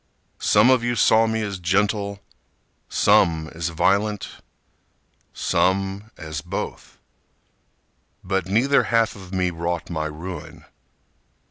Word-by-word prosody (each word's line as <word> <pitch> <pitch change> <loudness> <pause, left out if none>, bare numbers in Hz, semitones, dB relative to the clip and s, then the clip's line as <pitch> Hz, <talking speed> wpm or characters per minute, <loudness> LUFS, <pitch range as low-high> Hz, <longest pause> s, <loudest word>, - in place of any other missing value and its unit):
Some 105 +5 +4
of 125 -2 +3
you 120 0 0
saw 115 -1 +4
me 110 0 -1
as 100 -2 -4
gentle, 100 +3 0 0.7
Some 80 -2 +3
as 85 0 -3
violent, 100 +5 +1 1.0
Some 95 +3 0
as 80 -2 -6
both. - - -6 1.3
But 95 -1 -1
neither 125 +8 +3
half 115 -1 +1
of 95 -3 -12
me 90 -1 0
wrought 85 +1 -4
my 80 -2 -2
ruin. 85 +4 -8
95 Hz, 110 wpm, -23 LUFS, 85-105 Hz, 1.3 s, Some